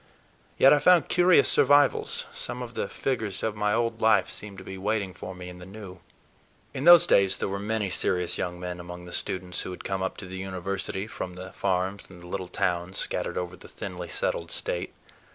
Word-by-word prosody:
Yet 135 - +7
I 145 - +4
found 175 +3 +5
curious 180 0 +5
survivals; 145 +2 +4
some 125 0 -4
of 120 -1 -8
the - - -3
figures 110 -7 -2
of 110 -1 -1
my 105 0 0
old 115 -1 -1
life 110 -1 +4
seemed 100 -2 -7
to 95 - -9
be 95 - -7
waiting 100 0 -1
for 90 +1 -8
me 90 0 -8
in 90 0 -10
the 90 - -10
new. 95 -2 -10 0.7
In 135 - -3
those 175 0 +9
days 100 - +4
there - - -2
were 100 0 -3
many 105 -1 -1
serious 90 -1 0
young 90 0 -3
men 90 0 -5
among 90 0 -8
the 90 - -10
students 90 -1 -3
who - - -5
had 90 - -8
come 95 -1 -2
up 95 - -2
to - - -7
the 95 0 -7
University 95 +1 -4
from 90 -4 -6
the 95 +1 -8
farms 95 +1 -1
and 90 -2 -13
the - - -10
little 95 0 -4
towns 90 -1 -1
scattered - - -2
over 90 -1 -3
the - - -14
thinly - - -7
settled - - -1
State. - - -3
95 Hz, 210 wpm, -27 LUFS, 90-110 Hz, 0.7 s, those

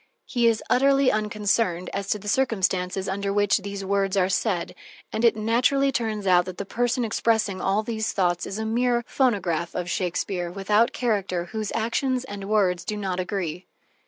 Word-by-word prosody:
He 240 -2 +1
is 225 -1 +1
utterly 275 +1 +4
unconcerned 210 -4 0
as 200 0 -3
to - - +1
the 210 0 -11
circumstances 190 -6 0
under 200 +1 -2
which 205 0 +2
these 200 0 -6
words 195 0 0
are 185 -1 +3
said, 185 -2 -1 0.4
and 220 - -1
it 230 -2 +5
naturally 250 +6 +2
turns 220 -5 -2
out 180 -2 +4
that 185 -1 -7
the 200 - -4
person 245 +3 0
expressing 220 -3 0
all 200 +3 +1
these 220 -1 -2
thoughts 175 -3 0
is 195 - -5
a 220 - -3
mere 240 +1 +1
phonograph 190 - 0
of 175 0 -3
Shakespeare, 180 -1 -2
without 205 +5 +2
character, 200 -7 -1
whose 215 +3 -4
actions 250 +3 0
and 200 -5 -7
words 185 -4 +2
do 210 - -4
not 190 -3 -2
agree. 180 -2 -3
205 Hz, 175 wpm, -25 LUFS, 185-230 Hz, 0.4 s, it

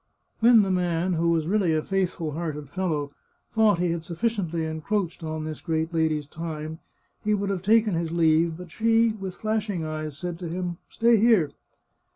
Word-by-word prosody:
When 230 -1 +7
the 195 - -1
man, 180 0 +1
who 170 0 +2
really 175 0 +1
was - - +2
a - - -18
faithful 185 -5 -1
hearted 150 -3 -5
fellow, 155 -6 -1 0.4
thought 220 -4 +4
he 175 0 +1
had 165 -1 -3
suf 170 0 -8
ficiently 180 -8 0
encroached 165 +3 -2
on 155 0 -3
this 155 -1 -6
great 160 0 -1
lady's 160 -2 +1
time, 155 +1 -6 0.4
he 210 0 +2
would 200 0 -1
have 190 -3 -2
taken 215 +1 +3
his 165 -1 -1
leave, 165 0 +3
but 180 -2 -10
she, 225 +3 +3
with 195 -4 -6
flashing 215 -6 -2
eyes, 155 -2 -4
said 175 +1 -5
to 175 -3 -5
him, 175 0 -3
"Stay 230 0 +4
here!" 210 -9 +4
170 Hz, 185 wpm, -26 LUFS, 160-200 Hz, 0.4 s, When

